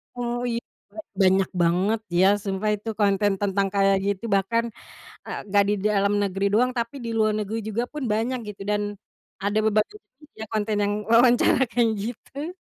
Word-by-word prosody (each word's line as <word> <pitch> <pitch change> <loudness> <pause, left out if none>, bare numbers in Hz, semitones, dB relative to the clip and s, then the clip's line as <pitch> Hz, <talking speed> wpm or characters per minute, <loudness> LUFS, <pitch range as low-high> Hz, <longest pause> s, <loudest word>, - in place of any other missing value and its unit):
Oh, 240 0 -3
iya. 235 0 -1 0.6
Banyak 190 0 +4
banget 185 +6 +2 0.2
ya 190 - +6 0.2
sumpah 195 +1 -1
itu 210 +2 -7
konten 205 0 +3
tentang 200 -1 +1
kayak 195 0 +4
gitu 200 +1 -1
bahkan, 230 +4 +1 0.6
eee, - - -5
nggak 200 +1 +4
di - - +2
dalam 200 -1 +2
negeri 195 0 -1
doang 250 +4 +3
tapi 235 +3 -3
di 230 - -3
luar 215 -1 +3
negeri 215 +1 -3
juga 220 +2 -1
pun 300 -1 -5
banyak 235 +4 0
gitu 200 -1 -8
dan 210 0 +1 0.6
ada 205 +1 +1
beberapa 215 - +1 0.5
ya - - -3
konten 215 0 0
yang 205 0 +1 0.2
wawancara 240 +2 +5
kayak 235 -1 +3
gitu. 275 - -6
210 Hz, 165 wpm, -24 LUFS, 200-230 Hz, 0.6 s, ya